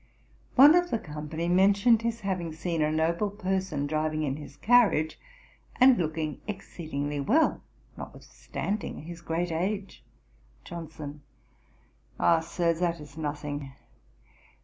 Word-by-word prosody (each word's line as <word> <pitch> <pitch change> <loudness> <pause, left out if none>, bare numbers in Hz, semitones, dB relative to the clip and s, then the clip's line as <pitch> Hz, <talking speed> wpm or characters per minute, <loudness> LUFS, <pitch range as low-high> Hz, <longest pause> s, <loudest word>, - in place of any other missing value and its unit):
One 285 +4 +9
of 355 0 +3
the 230 - +1
company 155 -1 -5
mentioned 200 +5 +4
his 230 0 -2
having 180 -5 -2
seen 165 0 -2
a 150 0 +2
noble 165 +6 +1
person 190 -7 -2
driving 155 +1 -1
in 135 -2 -1
his 145 -1 -11
carriage, 215 -9 +3 0.6
and 255 0 +7
looking 155 -4 -2
exceedingly 155 -8 -4
well, 260 - +2 0.3
notwithstanding 205 -6 -5
his 170 +1 -9
great 170 +1 -2
age. 195 +4 -3 0.6
JOHNSON. 155 -3 -8 1.0
'Ah, 170 -1 +4
Sir; 170 +1 0
that 170 0 -1
is 145 -1 -12
nothing. 145 -2 -4
170 Hz, 120 wpm, -28 LUFS, 155-195 Hz, 1.0 s, One